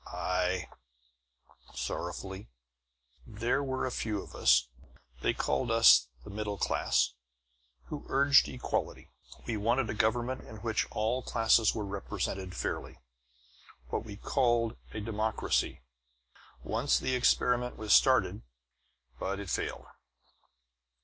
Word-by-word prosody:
"Aye," 90 0 -1 1.1
sorrowfully. 95 +3 -5 0.8
"There 115 +6 0
were 130 -1 -2
a 130 - -2
few 110 -3 -2
of - - -10
us - - +4 0.5
they - - +2
called 125 - -1
us 115 - +7 0.2
'the - - -9
middle 105 0 -3
class' - - +1 0.7
who 150 - -8
urged 140 +1 +5
equality. 125 - -3 0.3
We 115 - -2
wanted 115 +3 +1
a - - -3
government 120 +4 0
in 110 - -10
which 110 -2 0
all 115 +4 -1
classes 115 -2 +3
were 105 -2 -3
represented 95 -1 -4
fairly; - - -4 0.9
what - - -2
we 105 -3 -9
called 120 0 +1 0.2
a 105 - -5
democracy. 110 - -1 0.8
Once 115 +6 +1
the 130 - -1
experiment 125 0 +2
was 110 -1 +1
started, - - +4 0.8
but 100 +1 -2
it 100 -3 -5
failed. - - -3
110 Hz, 115 wpm, -30 LUFS, 100-120 Hz, 1.1 s, us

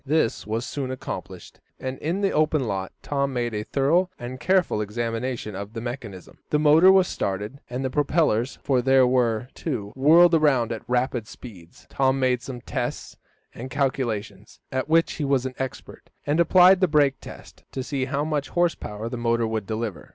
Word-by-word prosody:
This 145 -7 0
was 115 +3 -2
soon 135 -3 -4
accomplished, 130 0 -7 0.2
and 130 0 -5
in 170 +6 -2
the 195 - +2
open 155 -1 +2
lot 95 -5 -3
Tom 140 -1 -1
made 120 -2 -2
a 105 - -2
thorough 160 +10 +1
and 125 +2 -7
careful 185 - +1
examination 115 +1 -3
of 100 +2 -7
the 115 - -5
mechanism. 115 -6 -8
The 150 - +2
motor 155 +5 +6
was 190 -1 +5
started, 105 +7 -3
and 125 +2 -3
the 130 - -2
propellers, 145 -4 +1
for 130 -3 +2
there 130 +1 +5
were 125 -2 +1
two, 115 -10 -4
whirled 165 +6 +6
around 140 -8 +3
at 115 - -4
rapid 125 -2 0
speed. 90 -11 -12
Tom 135 0 +1
made 125 -2 +1
some 125 -1 -8
tests - - -4 0.4
and 130 +3 -8
calculations, 115 -7 -3
at 130 +3 -2
which 165 +1 +3
he 150 - -4
was 135 -2 +1
an 130 - -4
expert, 130 -2 -7 0.2
and 145 +3 +1
applied 180 +2 +6
the 185 - +3
brake 145 -4 +2
test, - - -12
to 130 - -4
see 135 -1 -2
how 140 +2 -2
much 150 -2 -2
horse 175 -1 +2
power 105 +2 -7
the 125 +1 -5
motor 115 0 +1
would 110 -3 -3
deliver. 110 -5 -4
130 Hz, 185 wpm, -24 LUFS, 115-150 Hz, 0.4 s, motor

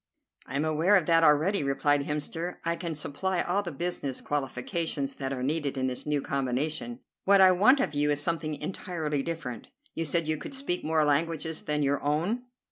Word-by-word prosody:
"I 130 - -6
am 145 +3 +1
aware 160 +6 +3
of 185 -5 +3
that 165 0 +4
already," 155 +4 +4
replied 140 +1 +1
Hemster. 160 +4 -3
"I 170 0 +1
can 170 -2 -4
supply 175 +5 -1
all 190 +3 0
the 175 -4 -5
business 145 -4 -3
qualifications 140 +1 -2
that 135 -1 -3
are 130 -2 -3
needed 145 0 -1
in 130 - 0
this 130 +2 -3
new 150 -2 0
combination. 145 - -2 0.2
What 200 0 +6
I 190 -1 +8
want 215 +10 +5
of 150 - 0
you 145 0 +1
is 145 -1 +1
something 155 0 -1
entirely 155 -2 -3
different. 135 -7 -5 0.2
You 165 - -2
said 160 +1 0
you 155 0 0
could 275 - -6
speak 265 -10 -1
more 155 -1 +2
languages 160 +2 0
than 150 -1 -1
your 140 0 +1
own?" 175 +12 0
155 Hz, 195 wpm, -28 LUFS, 145-170 Hz, 0.2 s, I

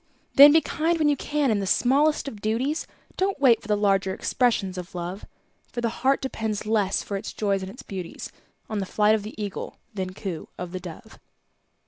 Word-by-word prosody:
Then 285 +1 +10
be 320 +2 +6
kind 330 +2 0
when 305 -2 +3
you 290 - +3
can 290 -2 0
in 210 - +1
the 195 - -2
smallest 285 +9 +3
of 215 -7 -7
duties, 245 +9 -1 0.3
Don't 385 -3 0
wait 250 -5 +5
for - - -12
the 210 -1 +2
larger 195 -2 +2
expressions 225 -7 0
of 180 +1 -9
Love; 180 +3 -5 0.4
For - - -4
the 235 - +1
heart 270 +1 +2
depends 220 -5 -3
less 210 -3 +1
for 200 - -3
its 200 - -6
joys 200 -2 0
and 190 - -5
its 255 +6 -11
beauties 185 -4 -7 0.4
On 215 -2 -3
the 195 - -3
flight 210 +2 +3
of 220 - +1
the 215 +2 -9
Eagle 205 -2 -5 0.2
than 185 -2 -4
coo 185 -6 -5
of 180 -1 -6
the 185 - -4
Dove. 175 -3 -11
215 Hz, 205 wpm, -25 LUFS, 195-265 Hz, 0.4 s, Then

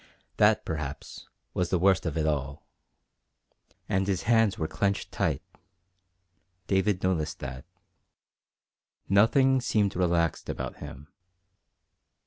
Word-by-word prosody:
That, - - +4
perhaps, 75 -3 -6 0.3
was 90 -1 -1
the 95 - +2
worst 95 0 +3
of 80 -1 -3
it 80 - +1
all. 70 -2 -2 1.2
And 95 0 0
his 95 -2 -1
hands 115 -3 +3
were 80 - -1
clenched 100 +4 -1
tight. - - -1 1.2
David 95 0 +1
noticed 85 -5 0
that. 65 0 -7 1.4
Nothing 130 +7 +4
seemed 105 -5 +1
relaxed 85 -2 0
about - - -4
him. 70 +3 -10
90 Hz, 110 wpm, -28 LUFS, 80-100 Hz, 1.4 s, That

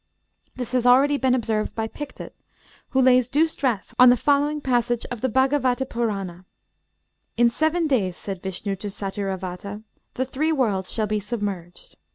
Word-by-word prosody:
This 250 -2 -5
has 250 -1 +1
already 275 +4 +5
been 260 -2 +2
observed 220 -3 -1
by 225 -1 -2
Pictet, 295 +5 -8 0.6
who 265 - +1
lays 255 -1 +4
due 300 +5 +3
stress 255 -9 -2
on 250 0 +9
the 245 - +5
following 290 +3 +2
passage 240 -3 0
of 240 -3 -5
the 260 - +1
Bhâgavata 260 0 +2
Purâna: 195 -8 -3 0.9
'In 240 0 +5
seven 315 +6 +1
days,' 205 - 0
said 195 -3 -6
Vishnu 195 +1 -3
to 205 - -6
Satyravata, 195 0 -5 0.3
'the 260 - -1
three 295 +5 -1
worlds 210 -11 0
shall 220 - 0
be 210 0 -1
submerged.' 200 -5 -6
240 Hz, 160 wpm, -23 LUFS, 200-265 Hz, 0.9 s, on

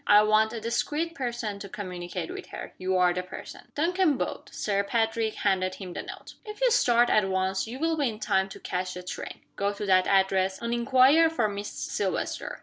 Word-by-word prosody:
I 210 0 +7
want 215 +1 +3
a 230 - -4
discreet 295 +9 -1
person 240 -7 -3
to 200 - -8
communicate 180 -3 -5
with - - -7
her. - - -8
You 185 0 0
are 180 -1 +4
the 180 - -2
person." 185 - -10
Duncan 335 -1 +2
bowed. - - -4
Sir 200 -1 -1
Pa 225 +3 +2
trick 225 -1 -2
handed 185 -2 0
him 185 -3 -8
the - - -4
note. - - -10
"If 425 -2 -8
you - - +3
start 240 - +4
at 205 -3 +3
once 190 +1 0
you 240 +3 -6
will 325 +3 +1
be 285 -4 +2
in 215 -1 -7
time 195 -3 +1
to - - -10
catch 185 0 -3
the 180 - -7
train. 180 - -7
Go 200 +1 0
to 205 +1 -5
that 185 -1 +4
address, 190 -1 +2
and 235 0 -2
inquire 260 +6 +5
for 240 -9 +1
Miss 205 0 -5
Silvester. 195 -3 -3
210 Hz, 215 wpm, -27 LUFS, 190-240 Hz, -, I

